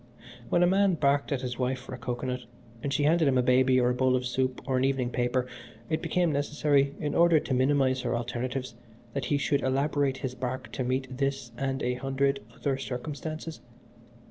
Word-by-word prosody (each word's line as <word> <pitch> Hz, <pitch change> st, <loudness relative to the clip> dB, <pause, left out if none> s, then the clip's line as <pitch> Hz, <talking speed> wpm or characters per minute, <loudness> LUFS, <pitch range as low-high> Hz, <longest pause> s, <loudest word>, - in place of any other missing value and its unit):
When 175 Hz, -, +3 dB
a -, -, +5 dB
man 195 Hz, 0 st, +3 dB
barked 140 Hz, -2 st, +1 dB
at 135 Hz, -3 st, 0 dB
his 125 Hz, -1 st, -4 dB
wife 130 Hz, +1 st, 0 dB
for 130 Hz, +1 st, -10 dB
a -, -, -5 dB
cocoanut 125 Hz, 0 st, -4 dB, 0.3 s
and 140 Hz, -, -2 dB
she 140 Hz, +1 st, +1 dB
handed 160 Hz, +1 st, +4 dB
him 130 Hz, -2 st, +3 dB
a 125 Hz, -, +3 dB
baby 130 Hz, +1 st, +4 dB
or 125 Hz, 0 st, +3 dB
a -, -, +1 dB
bowl 130 Hz, 0 st, +2 dB
of 125 Hz, 0 st, -1 dB
soup 130 Hz, +1 st, -1 dB
or 130 Hz, -, +1 dB
an 130 Hz, -, +2 dB
evening 135 Hz, -2 st, +1 dB
paper 125 Hz, +1 st, 0 dB, 0.5 s
it 160 Hz, 0 st, 0 dB
became 170 Hz, 0 st, +1 dB
necessary, 145 Hz, -1 st, +1 dB
in 150 Hz, -, -2 dB
order 170 Hz, -2 st, +5 dB
to 135 Hz, -, -3 dB
minimise 130 Hz, 0 st, +2 dB
her 120 Hz, -1 st, -1 dB
alternatives, 125 Hz, +1 st, -3 dB, 0.4 s
that 140 Hz, -3 st, -2 dB
he 145 Hz, +3 st, +1 dB
should 140 Hz, 0 st, +1 dB
elaborate 140 Hz, 0 st, +1 dB
his 130 Hz, -2 st, -4 dB
bark 130 Hz, +1 st, -4 dB
to 130 Hz, -, -2 dB
meet 130 Hz, +1 st, -2 dB
this 135 Hz, -3 st, -1 dB
and 135 Hz, 0 st, -2 dB
an 125 Hz, 0 st, 0 dB
hundred 135 Hz, +1 st, 0 dB
other 135 Hz, +2 st, -2 dB
circumstances. 155 Hz, +5 st, -5 dB
135 Hz, 200 wpm, -28 LUFS, 125-145 Hz, 0.5 s, a